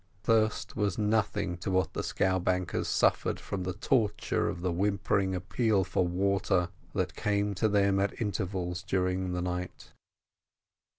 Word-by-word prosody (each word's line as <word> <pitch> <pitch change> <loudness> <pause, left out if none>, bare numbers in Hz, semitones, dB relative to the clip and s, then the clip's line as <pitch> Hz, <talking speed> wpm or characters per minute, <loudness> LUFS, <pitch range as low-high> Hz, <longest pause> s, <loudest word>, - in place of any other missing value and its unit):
Thirst 110 -1 +1
was 105 -5 0
nothing 105 -3 0
to 85 - -4
what 95 0 +1
the - - -2
scowbankers 95 -1 0
suffered - - +2
from 100 - -4
the 90 0 -2
torture 115 -5 +1
of 85 - -5
the 90 0 0
whimpering 95 +1 +1
appeal 100 +2 +1
for 90 0 0
water 95 0 +1 0.2
that - - -1
came 100 0 0
to 110 +3 +1
them 100 -1 +3
at 100 +1 -1
intervals 95 -4 -2
during 90 -1 -1
the 90 0 -2
night. 90 0 -5
95 Hz, 140 wpm, -30 LUFS, 90-105 Hz, 0.2 s, them